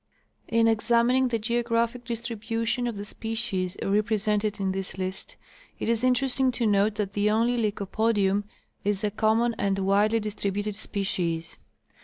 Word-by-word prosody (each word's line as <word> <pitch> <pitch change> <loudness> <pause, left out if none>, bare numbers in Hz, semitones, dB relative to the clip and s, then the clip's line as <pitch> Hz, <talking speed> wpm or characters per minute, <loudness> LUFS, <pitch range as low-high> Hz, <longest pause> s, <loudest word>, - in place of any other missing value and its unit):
In 230 0 +3
examining 235 +3 +3
the 240 -2 0
geographic 235 +1 0
distribution 230 +1 -2
of 230 -3 -3
the 200 - -5
species 220 -4 -3
represented 210 0 +1
in 195 -1 0
this 190 0 -5
list 185 0 -5 0.4
it - - -4
is 230 +1 +1
interesting 255 +1 +2
to 240 -1 -1
note 205 0 +3
that 205 -2 -2
the 205 +1 +2
only 230 +3 +2
Lycopodium 205 -2 +1 0.4
is 205 0 -1
a 210 - +1
common 225 +3 +2
and 195 -1 +1
widely 200 +3 +3
distributed 205 -1 -3
species. 175 -5 -2
215 Hz, 140 wpm, -26 LUFS, 200-230 Hz, 0.4 s, In